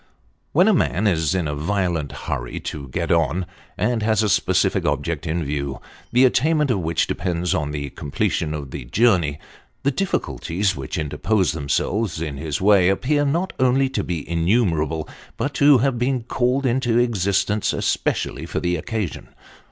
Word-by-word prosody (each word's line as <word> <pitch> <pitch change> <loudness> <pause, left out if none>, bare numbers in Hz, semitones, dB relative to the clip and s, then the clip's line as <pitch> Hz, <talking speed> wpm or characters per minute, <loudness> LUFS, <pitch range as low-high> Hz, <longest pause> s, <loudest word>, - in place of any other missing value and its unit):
When 180 +7 +4
a 220 - +5
man 110 - +1
is 85 -3 +2
in 90 -4 0
a 75 - -2
violent 85 -1 -1
hurry - - -4
to 70 -3 -6
get 65 - -2
on, 90 +4 +1 0.3
and 110 +4 0
has 110 0 +2
a 105 - +1
specific - - +2
object - - -1
in 80 +1 -1
view, 70 -2 -3 0.3
the 125 +2 +5
attainment 150 +2 +2
of 105 - +1
which 85 -1 0
depends 90 -1 -1
on 75 -2 -1
the 70 -2 -4
completion 75 +2 -2
of 70 -4 -7
his - - -6
journey, 90 - +3 0.5
the 140 - +2
difficulties 100 - -1
which 65 - -5
interpose 80 +7 0
themselves 80 +6 -1
in 75 -4 -4
his 75 0 -3
way 95 -2 +5
appear 145 +9 +1
not 170 +7 0
only 130 +1 +3
to 135 - -2
be 85 -5 -4
innumerable, 85 -3 +1 0.3
but 145 - -2
to 145 0 +6
have 125 0 +1
been 125 -1 0
called 125 +3 0
into 120 -2 +1
existence 105 -3 +1
especially - - -1
for - - -2
the 90 0 0
occasion. 105 +2 -4
95 Hz, 165 wpm, -22 LUFS, 80-120 Hz, 0.5 s, to